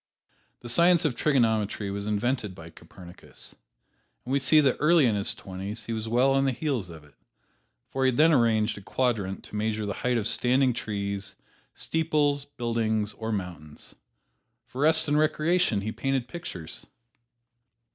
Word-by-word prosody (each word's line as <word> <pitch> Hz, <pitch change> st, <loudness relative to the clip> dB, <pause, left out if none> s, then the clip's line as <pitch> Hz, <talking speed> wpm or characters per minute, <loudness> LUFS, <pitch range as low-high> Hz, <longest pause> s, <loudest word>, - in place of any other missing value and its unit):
The 120 Hz, -, -9 dB
science 170 Hz, +6 st, +4 dB
of 140 Hz, -6 st, 0 dB
trigonometry 110 Hz, -7 st, +1 dB
was 100 Hz, +1 st, -5 dB
invented 105 Hz, -1 st, -1 dB
by 85 Hz, -1 st, -11 dB
Copernicus, 85 Hz, +2 st, -13 dB, 0.7 s
and 125 Hz, -, -5 dB
we 140 Hz, -, +3 dB
see 155 Hz, +3 st, +4 dB
that 135 Hz, -3 st, +2 dB
early 155 Hz, -1 st, +4 dB
in 115 Hz, -, +2 dB
his 100 Hz, -1 st, +1 dB
twenties 95 Hz, +4 st, -7 dB
he 115 Hz, -, -4 dB
was 110 Hz, 0 st, -4 dB
well 125 Hz, +4 st, +3 dB
on 135 Hz, 0 st, +2 dB
the 135 Hz, -, +2 dB
heels 125 Hz, -, -3 dB
of 80 Hz, -2 st, -11 dB
it, 75 Hz, -, -21 dB, 0.8 s
for 135 Hz, -, -1 dB
he -, -, +4 dB
had 130 Hz, -, +1 dB
then 160 Hz, +2 st, +5 dB
arranged 110 Hz, -4 st, +2 dB
a -, -, -13 dB
quadrant 105 Hz, -4 st, -2 dB
to -, -, -11 dB
measure 110 Hz, 0 st, -1 dB
the 100 Hz, -, -3 dB
height 125 Hz, +3 st, -1 dB
of 110 Hz, -1 st, -1 dB
standing 125 Hz, +2 st, +2 dB
trees, 100 Hz, -3 st, -4 dB, 0.4 s
steeples, 150 Hz, -3 st, 0 dB
buildings 115 Hz, -5 st, -2 dB
or 115 Hz, 0 st, -5 dB
mountains. 85 Hz, -7 st, -7 dB, 0.7 s
For 130 Hz, -, -7 dB
rest 160 Hz, +1 st, +4 dB
and 145 Hz, +1 st, +2 dB
recreation 155 Hz, -, +1 dB
he 110 Hz, +2 st, -3 dB
painted 135 Hz, 0 st, -2 dB
pictures. 90 Hz, -, -8 dB
115 Hz, 165 wpm, -26 LUFS, 100-140 Hz, 0.8 s, then